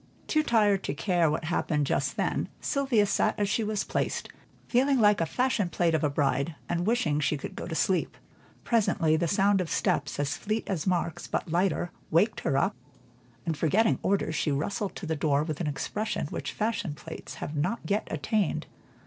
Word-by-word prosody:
Too 310 - +2
tired 210 -8 +3
to 140 - -2
care 175 -1 +2
what 155 +2 -1
happened 155 -3 0
just - - -1
then, - - 0
Sylvia 265 -7 +2
sat 205 - +1
as 205 - +2
she 220 +3 0
was 210 -1 -1
placed, - - -2 0.4
feeling 265 +2 +3
like 210 -4 +5
a 165 - +1
fashion 245 -4 +1
plate 170 -1 +1
of 160 - +1
a 150 - +3
bride, 140 +2 0
and 175 +2 -1
wishing 180 -11 +2
she 150 0 +1
could - - -7
go - - -5
to 165 - -4
sleep. 185 +2 +1 0.5
Presently 195 -8 +2
the 170 +2 +1
sound 195 +2 +3
of 175 - -3
steps 145 0 0
as 145 -1 0
fleet 215 +2 -2
as 185 -3 -2
Mark's 175 -2 -1
but 165 - -2
lighter, 175 0 +1 0.2
waked 195 +7 +3
her 135 - 0
up, 140 - +1 0.7
and 165 -2 0
forgetting 195 +9 +2
orders, 190 -5 +1
she 155 -1 0
rustled 190 +8 -2
to - - -6
the 160 0 -1
door 145 -1 +2
with 155 +1 -4
an 165 - -1
expression 210 +9 -2
which - - -4
fashion 210 -8 -2
plates 160 +1 -9
have 150 - -5
not 180 +10 -1
yet 205 +1 0
attained. 190 +5 0
175 Hz, 190 wpm, -28 LUFS, 155-210 Hz, 0.7 s, like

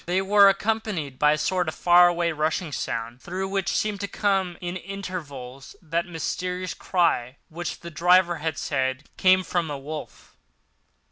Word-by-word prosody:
They 180 +2 +1
were 200 0 +7
accompanied 195 -9 -2
by 150 0 +5
a - - 0
sort 180 +3 0
of 155 - -3
far 175 0 +6
away 170 -1 +1
rushing 155 +2 -1
sound, 115 -2 -4
through 185 +2 -4
which 195 -1 -1
seemed 210 -2 -1
to 200 - -2
come 195 -4 0
at - - -17
intervals 175 -8 -7
that 170 +1 -2
mysterious 180 +2 -3
cry 140 -8 0
which 170 +1 -5
the 170 - -8
driver 175 +2 +4
had 155 -1 -3
said 130 0 -2
came 185 0 +4
from 175 -3 -1
a 145 - -3
wolf. 150 +2 -9
175 Hz, 160 wpm, -25 LUFS, 150-185 Hz, -, were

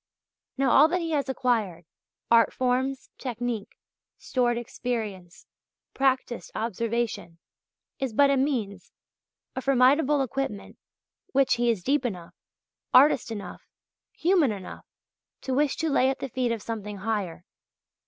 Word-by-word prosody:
Now 265 -2 +2
all 295 - +7
that 360 +2 -1
he 330 -1 -3
has 285 -3 0
acquired 225 -10 -1 0.5
art 230 -1 +5
forms, 260 +1 -1
technique, 240 -3 -4 0.4
stored 240 -2 0
experience, 220 -7 -5 0.5
practised 260 -3 0
observation 230 -5 -2 0.6
is 265 -2 -2
but 280 +5 +4
a - - +3
means, 235 -9 -2 0.6
a 260 - -3
formidable 275 +2 +3
equipment 265 -5 -4 0.5
which 270 0 +4
he 240 0 +1
is 215 -6 0
deep 280 +4 +1
enough, 180 -8 -5 0.6
artist 265 -2 +6
enough, 215 -3 -7 0.5
human 335 - +2
enough, 195 -3 -8 0.5
to 265 - -3
wish 285 +1 +2
to 325 - -1
lay 265 -1 +3
at 270 - -1
the 270 - -5
feet 250 0 -1
of 230 -3 -3
something 210 -3 -5
higher. 195 -5 -3
245 Hz, 130 wpm, -26 LUFS, 220-270 Hz, 0.6 s, all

